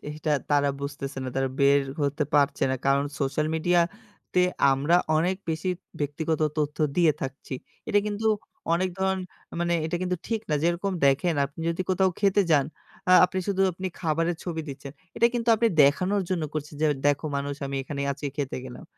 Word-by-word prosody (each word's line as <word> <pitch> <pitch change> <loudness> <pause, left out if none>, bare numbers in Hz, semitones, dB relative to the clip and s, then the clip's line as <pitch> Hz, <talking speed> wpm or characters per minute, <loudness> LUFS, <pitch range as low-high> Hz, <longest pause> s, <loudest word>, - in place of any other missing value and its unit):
এইটা 155 0 -2 0.2
তারা 145 -1 +3
বুঝতেছে 140 -1 -5
না - - -3
তারা 135 0 +1
বের 140 +1 +5 0.2
হতে 145 +1 0
পারছে 140 -1 +3
না, 130 - +1
কারণ 140 +1 +3 0.2
সোশ্যাল 140 +2 0
মিডিয়া 175 +2 +3 0.5
তে 180 - +5 0.3
আমরা 145 +6 +3 0.2
অনেক 180 +4 +1
বেশি 160 +4 -1 0.3
ব্যক্তিগত 155 +2 -1 0.2
তথ্য 150 -1 -1 0.2
দিয়ে 170 -4 +5
থাকছি। 135 0 -5 0.3
এটা 205 -2 +4
কিন্তু 210 +1 -2 0.5
অনেক 185 +2 +1
ধরন 190 0 +1 0.3
আ - - -7
মানে 175 0 +1
এটা 175 - -1
কিন্তু 180 0 0
ঠিক 225 -1 0
না। - - +3
যেরকম 175 +4 0
দেখেন 145 +5 +2
আপনি 145 +3 -8
যদি 170 +2 -1
কোথাও 185 0 +3
খেতে 200 0 +4
যান, 145 -3 +5 0.5
আ - - +7
আপনি 185 +1 -1
শুধু 195 -1 +2
আপনি 185 +2 -5
খাবারের 165 0 0
ছবি 165 -3 -3
দিচ্ছেন। 140 0 -8 0.2
এটা 235 - +5
কিন্তু 235 0 -1
আপনি 230 +1 +3
দেখানোর 185 +8 +3
জন্য 180 -3 0
করছেন 150 0 -5
যে, 155 - +5 0.2
"দেখো 145 +1 +2
মানুষ 140 0 -2
আমি 135 0 -4
এখানে 140 +1 -5
আজকে 145 +1 -5
খেতে 140 -3 -2
গেলাম 125 -1 -9
160 Hz, 185 wpm, -26 LUFS, 140-185 Hz, 0.5 s, আ